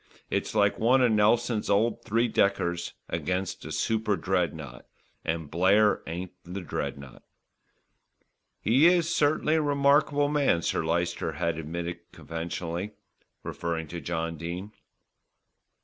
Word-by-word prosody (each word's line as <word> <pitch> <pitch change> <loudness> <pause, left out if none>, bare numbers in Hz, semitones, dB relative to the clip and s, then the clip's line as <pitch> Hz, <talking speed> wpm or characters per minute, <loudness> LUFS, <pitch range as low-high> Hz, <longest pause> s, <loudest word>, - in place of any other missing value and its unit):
It's - - -1
like 100 -1 +3
one 125 +4 +4
of 120 - +4
Nelson's 110 +1 +2
old 105 +3 +2
three 115 +3 +1
deckers 85 -5 0
against 95 0 -2
a - - -6
super 110 -2 0
dreadnought, 80 -8 -2 0.4
and 80 -2 -3
Blair 100 +5 +4
ain't 85 +3 -5
the 90 +3 -6
dreadnought." 70 -6 -5 1.4
"He 130 +9 +5
is 175 -1 +3
certainly 150 +1 +2
a 160 - +3
remarkable 145 0 +3
man," 145 - +2
Sir - - 0
Lyster 85 0 -1
had 85 +1 -1
admitted 85 +2 -4
conventionally, 85 +4 -5 0.5
referring 85 -2 -3
to 85 +1 -6
John 85 -1 -3
Dene. 90 +5 -5
95 Hz, 120 wpm, -27 LUFS, 85-115 Hz, 1.4 s, He